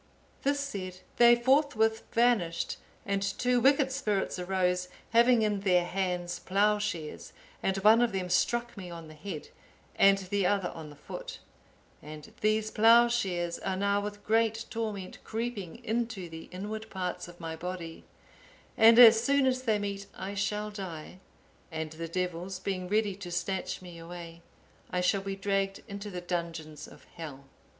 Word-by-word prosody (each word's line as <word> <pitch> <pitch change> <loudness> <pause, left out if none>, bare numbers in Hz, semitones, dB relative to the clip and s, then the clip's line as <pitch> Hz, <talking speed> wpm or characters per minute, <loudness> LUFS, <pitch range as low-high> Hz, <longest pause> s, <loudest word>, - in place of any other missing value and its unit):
This 285 +1 +1
said, 185 -10 -5 0.2
they 240 0 +8
forthwith 240 -3 +2
vanished, 225 -9 +1 0.3
and 200 0 0
two 245 +5 +1
wicked 270 +1 +4
spirits 210 -9 -1
arose, 180 0 0 0.2
having 235 0 +5
in 210 -2 +1
their 180 -3 +3
hands 180 -1 -2
ploughshares, 200 -5 -1 0.3
and 195 0 0
one 215 +4 +6
of 240 - +2
them 190 -2 -2
struck 235 +6 +1
me 185 -4 -8
on 165 -2 -9
the - - -11
head, 155 0 -7 0.5
and 195 0 +6
the 195 +1 -1
other 195 -2 0
on 160 -2 -9
the 145 - -12
foot. - - -8 0.6
And 150 0 -10
these 215 0 +1
ploughshares 225 -7 +4
are 190 -1 -2
now 200 +1 +1
with 205 0 -6
great 225 0 +2
torment 210 -5 -4
creeping 225 -2 -5
into 225 -5 -2
the 160 0 -9
inward 215 +4 -6
parts 180 -2 -4
of 175 0 -13
my 165 -1 -5
body, 170 -1 -6 0.7
and 225 +1 +7
as 230 -2 +9
soon 280 0 +3
as 255 -1 +1
they 225 -4 +1
meet 200 -1 -4
I 195 +1 -5
shall 210 +1 -2
die, 185 -4 -7 0.5
and 160 -1 -4
the 165 +1 -6
devils 180 +1 -3
being 185 -1 -3
ready 210 -1 +1
to 195 -3 -7
snatch 185 +1 -3
me 175 -2 -10
away, 170 0 -9 0.5
I 180 - -1
shall 185 +2 +2
be 195 0 -4
dragged 195 0 -1
into 200 0 -6
the 180 -2 -5
dungeons 170 -3 -4
of - - -15
hell." 145 -5 -8
195 Hz, 160 wpm, -30 LUFS, 180-220 Hz, 0.7 s, as